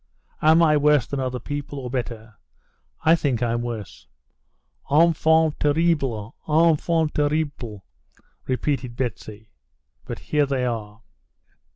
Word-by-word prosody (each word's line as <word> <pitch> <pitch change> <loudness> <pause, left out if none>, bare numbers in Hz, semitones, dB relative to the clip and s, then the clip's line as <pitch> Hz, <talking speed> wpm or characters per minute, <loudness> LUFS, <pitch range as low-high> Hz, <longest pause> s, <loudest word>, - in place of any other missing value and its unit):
"Am 160 +2 +5
I 155 -2 +4
worse 150 -3 +3
than 140 - -4
other 130 -1 -2
people, 145 +1 -6
or 125 -3 -6
better? 115 -3 -5 0.7
I 160 +2 +6
think 135 -7 -1
I'm 120 0 0
worse." 115 -6 -7 0.8
"Enfant 160 0 +3
terrible, 145 -8 0
enfant 160 0 +2
terrible!" 145 -9 -2 0.6
repeated 130 -2 -2
Betsy. 110 -3 -5 0.5
"But - - -6
here 150 -2 0
they 135 -2 -1
are." 110 -2 -5
140 Hz, 110 wpm, -23 LUFS, 120-155 Hz, 0.8 s, I